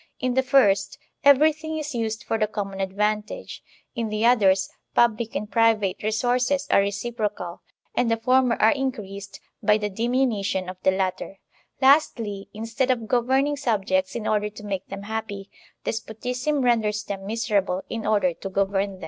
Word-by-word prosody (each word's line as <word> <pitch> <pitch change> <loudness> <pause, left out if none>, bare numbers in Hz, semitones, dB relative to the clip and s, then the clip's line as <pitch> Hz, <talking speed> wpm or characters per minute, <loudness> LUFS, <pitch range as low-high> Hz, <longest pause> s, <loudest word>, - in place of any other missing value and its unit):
In 255 -1 0
the 265 - +3
first, 205 -8 +3 0.3
everything 310 +3 +4
is 300 -1 -4
used 225 -2 -2
for 225 - -1
the 215 - +2
common 195 -2 -4
advantage; 210 +2 -2 0.3
in 230 -3 -2
the 215 +1 0
others, 195 -6 +4 0.3
public 230 -1 +2
and 210 - -2
private 215 -3 +2
resources 250 +6 +1
are - - +6
reciprocal, 205 -2 -3 0.3
and 245 -1 +1
the 230 - +2
former 255 +1 +3
are 220 - +4
increased 205 -8 -4 0.2
by 210 - +4
the 210 -1 -3
dimi 240 +6 +1
nution 195 -5 -1
of 185 0 -7
the - - +3
latter; 190 +1 -2 0.5
lastly, 230 -8 +3
instead 225 +4 -2
of 235 -4 0
governing 265 +5 +2
subjects 195 -8 0
in 230 -2 -4
order 210 -1 +1
to 210 0 -12
make 195 -2 -4
them 195 0 -7
happy, 205 -2 -5 0.3
despotism 250 +6 -2
renders 215 -4 +1
them 195 -2 -6
miserable 200 -4 0
in 225 -1 -4
order 205 -5 +2
to 195 +4 -7
govern 195 +1 0
them. 190 - -13
215 Hz, 160 wpm, -24 LUFS, 200-245 Hz, 0.5 s, are